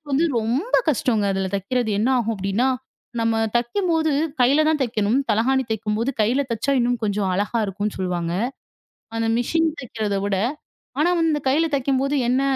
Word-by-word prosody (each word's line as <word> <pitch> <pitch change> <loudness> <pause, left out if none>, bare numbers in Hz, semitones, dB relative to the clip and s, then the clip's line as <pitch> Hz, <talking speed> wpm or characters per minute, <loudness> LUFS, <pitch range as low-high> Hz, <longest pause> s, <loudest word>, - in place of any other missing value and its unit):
வந்து 280 +5 +2
ரொம்ப 250 - 0
கஷ்டோங்க. 235 -7 +1
அதில் 190 0 -2
தைக்கிறது 220 +4 -1
என்ன 230 +5 +2
ஆகும் 225 -1 -1
அப்படி 195 +1 -3
என்றால், 255 +2 +2 0.4
நம்ம 225 0 +1 0.2
தைக்கும்போது 320 +6 +1 0.3
கையில் 280 +5 +4
தான் 310 -2 +1
தைக்கவேண்டும். 225 0 +1
தலையணை 260 +5 +2
தைக்கும்போது 220 +3 -1
கையில் 255 +6 +1
தைச்சால் 260 +4 +1
இன்னும் 245 -1 0
கொஞ்சம் 205 -2 0
அழகாக 210 +4 0
இருக்கும் 200 +2 -3
என்று 210 - -4
சொல்லுவாங்க. 175 -2 -2 0.8
அந்த 225 0 0
மெஷின் 325 +6 +1
தைக்கிறதை 215 -5 -2
விட 200 -2 0 0.6
ஆனா 345 +4 +3 0.4
கையில் 310 +4 +2
தைக்கும்போது 275 +1 +1
என்ன 255 +2 +2
240 Hz, 155 wpm, -22 LUFS, 210-275 Hz, 0.8 s, கையில்